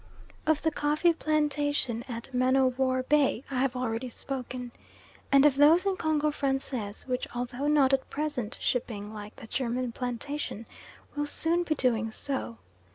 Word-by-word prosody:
Of 315 -1 +2
the 320 - +2
coffee 300 +4 +2
plantation 290 -6 0
at 235 +2 -6
Man 255 +1 +3
o' 265 -1 +5
War 255 0 0
Bay 275 -3 +2
I 255 - 0
have 260 -1 +1
already 250 0 -2
spoken, 250 -1 -5 0.6
and 275 0 +6
of 295 - +6
those 310 +6 +6
in 390 -1 +2
Congo 305 -3 +1
Francais, 270 -7 -3
which, 255 -1 -2
although 245 +3 -2
not 285 -3 +4
at 270 - +1
present 285 -7 -3
shipping 215 -4 -2
like 210 0 -8
the 250 - -11
German 250 +1 -1
plantation, 250 0 -4 0.5
will 290 0 -1
soon 330 +4 +2
be 330 -3 0
doing 230 -5 +1
so. 220 - -3
265 Hz, 160 wpm, -29 LUFS, 245-295 Hz, 0.6 s, and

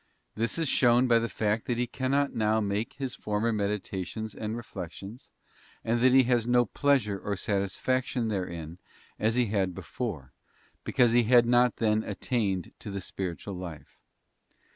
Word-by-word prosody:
This 115 +6 -1
is 165 -2 0
shown 125 0 +4
by 115 -1 +5
the 115 0 -2
fact 110 0 -1
that 120 - 0
he 125 - +1
cannot 135 +3 0
now 110 0 +2
make 105 +5 -2
his 135 -2 -4
former 105 +2 -1
meditations 105 +1 -3
and 110 +1 -4
reflections, 100 +1 -8 0.5
and 115 +1 +1
that 130 +2 +5
he 130 +1 +6
has 120 -2 +1
no 120 0 +4
pleasure 115 -5 +1
or 100 0 -3
satisfaction 115 +6 -1
therein 85 -5 -4 0.4
as 110 +2 +1
he 125 -1 +3
had 95 -4 -1
before, 80 - -5 0.5
because 120 -2 +3
he 120 0 +4
had 120 +1 +6
not 120 0 +4
then 110 -1 +1
attained 105 -3 -2
to - - -8
the 100 0 -4
spiritual 95 +1 -5
life. 90 -5 -9
110 Hz, 160 wpm, -28 LUFS, 100-120 Hz, 0.5 s, he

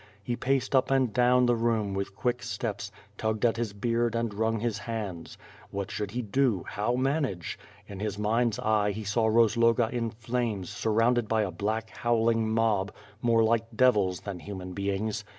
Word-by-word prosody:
He 120 +3 -2
paced 135 +2 0
up 130 - +3
and 130 -5 +2
down 125 0 +4
the 120 0 +3
room 115 -3 0
with 100 0 -3
quick 120 +3 -1
steps, 105 -3 -4 0.3
tugged 110 0 0
at 115 -1 +2
his 115 -3 -2
beard 115 +3 0
and 115 -2 -1
rung 110 +2 0
his 110 -2 -2
hands. 100 -6 -5 0.3
What 100 -1 -4
should 105 -2 -3
he 120 +4 -3
do^ 115 -3 +1
how 110 +4 -1
manage! 130 - -1 0.3
In 100 -2 -9
his 105 -1 -3
mind's 115 +2 +1
eye, 110 -4 +2
he 110 +2 -5
saw 110 +2 +1
Rozloga 115 +1 +3
in 120 -2 -1
flames 115 -4 -3
surrounded 115 +1 +1
by 110 0 +2
a 95 - -2
black 110 +5 -2
howling 115 -1 +1
mob 110 -3 +1 0.3
more 115 -1 +4
like 115 0 +2
devils 105 -8 +3
than 100 -3 -6
human 95 0 -7
beings. 100 +2 -2
110 Hz, 175 wpm, -28 LUFS, 105-120 Hz, 0.3 s, down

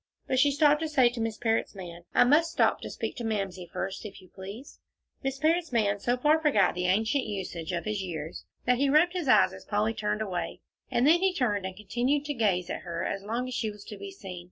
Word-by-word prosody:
But 260 - +1
she 285 - +5
stopped 295 +1 +4
to 320 - -1
say 260 -5 +5
to 240 -1 -5
Miss 225 -1 -2
Parrott's 225 -2 0
man, 175 -2 -9
"I - - +7
must 310 +6 +4
stop - - +2
to - - -6
speak - - -4
to 240 - -4
Mamsie, 195 -5 -3
first, 195 0 -4
if 205 -2 -9
you 185 -2 -17
please." 200 +9 -10 0.4
Miss 270 0 -2
Parrott's 325 +3 +1
man 205 -4 +1
so 245 +4 0
far 300 +5 +4
forgot 215 - +3
the 180 0 -1
ancient 220 +8 +2
usage 185 -5 -4
of 170 -1 -3
his 215 -2 -1
years 160 -4 -6 0.2
that 250 0 +3
he 280 0 +3
rubbed 320 +5 +4
his 355 -6 -3
eyes 95 - +5
as 95 - -10
Polly 210 +2 0
turned 210 0 -1
away, 185 -4 -4 0.3
and 240 - +2
then 325 +4 +6
he 380 -1 +2
turned 205 - 0
and 190 0 -9
continued 245 +8 0
to 295 - -2
gaze 195 -8 +1
at - - -4
her 170 -1 -4
as 195 - -2
long 230 +5 -3
as 255 - -5
she 230 -2 -1
was 205 -1 -10
to - - -8
be 400 - -8
seen. 190 - -8
220 Hz, 245 wpm, -28 LUFS, 190-275 Hz, 0.4 s, I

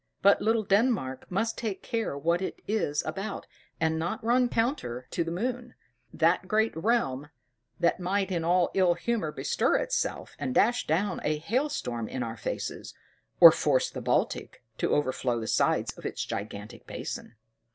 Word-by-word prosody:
But 200 +1 +6
little 225 0 +2
Denmark 195 - +1
must 225 +5 -1
take 215 -5 -4
care 225 - -2
what 170 +5 +1
it 190 - -5
is 200 -9 0
about, 195 +6 -4 0.3
and 160 0 +1
not 170 +5 -3
run 245 +2 +3
counter 225 - -1
to 170 - 0
the 165 - -4
moon; 245 +7 -3 0.4
that 165 +3 +2
great 220 +2 +1
realm, 160 - 0 0.5
that 170 +1 +2
might 190 +2 0
in 170 -3 -1
an 175 +1 +3
ill 185 -3 +3
humor 210 -4 -1
bestir - - +1
itself, - - -2
and 255 - -3
dash 240 +3 +3
down 180 +4 0
a 150 0 +1
hail 250 - 0
storm 120 - -3
in 125 +2 -3
our 115 -1 -4
faces, 105 - -5 0.4
or - - +12
force - - +1
the - - -6
Baltic - - -1 0.2
to - - +1
overflow 130 -4 0
the 110 - -4
sides - - +1
of - - -13
its - - -4
gigantic 105 +3 -6
basin. 120 - -6
180 Hz, 165 wpm, -28 LUFS, 150-225 Hz, 0.5 s, or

